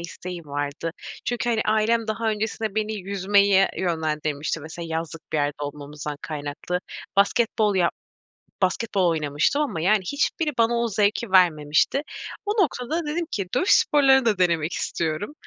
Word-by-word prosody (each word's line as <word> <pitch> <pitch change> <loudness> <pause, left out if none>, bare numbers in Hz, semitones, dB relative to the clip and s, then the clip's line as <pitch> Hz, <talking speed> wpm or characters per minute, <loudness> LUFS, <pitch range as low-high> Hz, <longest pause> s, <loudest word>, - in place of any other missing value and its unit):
isteği 175 +1 -7
vardı. 145 +3 -3 0.3
Çünkü, 240 0 -1
hani, 220 -2 +1
ailem 220 +1 +2
daha 220 +1 -1
öncesinde 215 0 -2
beni 215 0 -1
yüzmeye 200 0 +3
yönlendirmişti. 155 -3 -1
Mesela, 160 +2 -7
yazlık 165 0 -5
bir - - +1
yerde 145 0 +1
olmamızdan 145 0 -6
kaynaklı. 150 +4 -4 0.4
Basketbol 210 0 +2
yap 175 -2 +2 0.7
basketbol 190 -1 +1
oynamıştım 155 - +1
ama, 170 - -2
yani, 205 +5 +3
hiçbiri 300 +2 0
bana 230 +1 +3
o 235 0 +1
zevki 210 +1 0
vermemişti. 170 - +3 0.4
O - - 0
noktada 305 +2 -2
dedim 330 +3 -2
ki 195 -3 -2
dövüş 365 +9 +1
sporları 270 -3 +5
da 210 -4 +2
denemek 170 -3 +1
istiyorum. 165 - -2
190 Hz, 140 wpm, -24 LUFS, 160-225 Hz, 0.7 s, sporları